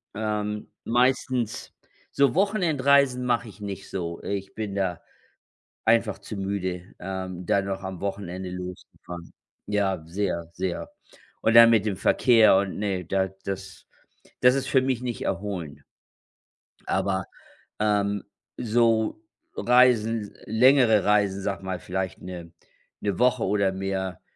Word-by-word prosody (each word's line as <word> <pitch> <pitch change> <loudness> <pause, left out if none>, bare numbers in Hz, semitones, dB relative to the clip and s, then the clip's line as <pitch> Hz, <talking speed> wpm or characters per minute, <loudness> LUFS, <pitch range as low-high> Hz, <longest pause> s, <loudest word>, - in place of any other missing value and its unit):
ähm, 105 -1 -3
meistens 125 -1 0 0.4
so 140 -1 +3
Wochenendreisen 140 -10 +3
mache 120 -1 0
ich 105 +1 -15
nicht 100 -1 -6
so, 85 -3 -5
ich 100 -1 -4
bin 105 -3 -4
da 95 -3 -1 0.9
einfach 115 -3 +2
zu 100 +2 -8
müde, 95 -2 -3
ähm, 95 -1 -5
da 100 - +2
noch 95 0 -4
am 95 -2 -6
Wochenende 95 -2 -4
loszufahren. 90 -1 -9 0.4
Ja, 100 -4 0
sehr, 85 -1 -2
sehr. 90 0 -4 0.5
Und 115 - +2
dann 115 0 +10
mit 110 -3 +3
dem 105 -3 -1
Verkehr 115 -3 +5
und 95 -1 -1
ne, 95 -3 -2
da 95 +2 0 0.2
das 95 -1 -6 0.5
das 125 0 +6
ist 135 -1 -1
für 130 - +3
mich 130 -2 -1
nicht 125 -2 -4
erholend. 95 -6 -4 1.0
Aber, 95 -2 0 0.5
ähm, 105 -1 +1 0.3
so 115 - +2 0.4
Reisen 120 -2 +4
s - - -19
längere 115 -2 +5
Reisen, 100 -2 +2
sage 100 0 -3
mal, 95 -1 -3
vielleicht 95 0 -4
'ne 90 -2 -8 0.5
'ne 100 -2 -2
Woche 125 -1 +3
oder 100 -1 +2
mehr, 95 -2 -3
100 Hz, 130 wpm, -25 LUFS, 95-115 Hz, 1.0 s, dann